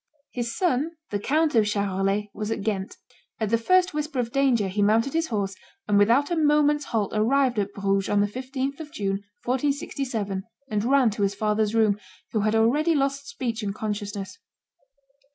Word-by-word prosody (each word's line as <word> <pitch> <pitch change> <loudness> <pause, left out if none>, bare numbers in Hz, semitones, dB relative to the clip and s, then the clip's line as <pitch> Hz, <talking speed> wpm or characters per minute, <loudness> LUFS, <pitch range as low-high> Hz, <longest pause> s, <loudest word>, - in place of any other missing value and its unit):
His 235 -2 -3
son, 325 -2 +1 0.2
the 205 - -1
Count 305 +8 +1
of 220 -3 +4
Charolais, 200 0 0
was 210 0 -4
at 225 - -2
Ghent. 200 -2 -2 0.4
At 220 -2 -1
the 230 - +4
first 365 +9 +3
whisper 300 -1 -3
of 240 -2 -1
danger 255 -7 +2
he 195 +2 -1
mounted 225 +6 +3
his 325 0 +1
horse, 200 -5 -2 0.3
and 205 -1 +4
without 240 +10 +3
a - - +2
moment's 295 -1 +3
halt 215 -4 -1
arrived 245 +2 +2
at 200 0 -1
Bruges 195 -1 0
on 205 - +2
the 205 - +4
15th 260 +5 -4
of 305 -2 -8
June, 195 -4 -2 0.2
1467, 250 -6 -1 0.3
and 210 -1 0
ran 260 -3 +4
to 205 - -5
his 200 0 +1
father's 215 +1 0
room, 215 -2 +3 0.3
who 220 - 0
had 215 +1 +1
already 290 +9 +3
lost 275 0 0
speech 245 -5 -3
and 200 -1 -3
consciousness. 205 - -4
225 Hz, 180 wpm, -25 LUFS, 205-275 Hz, 0.4 s, of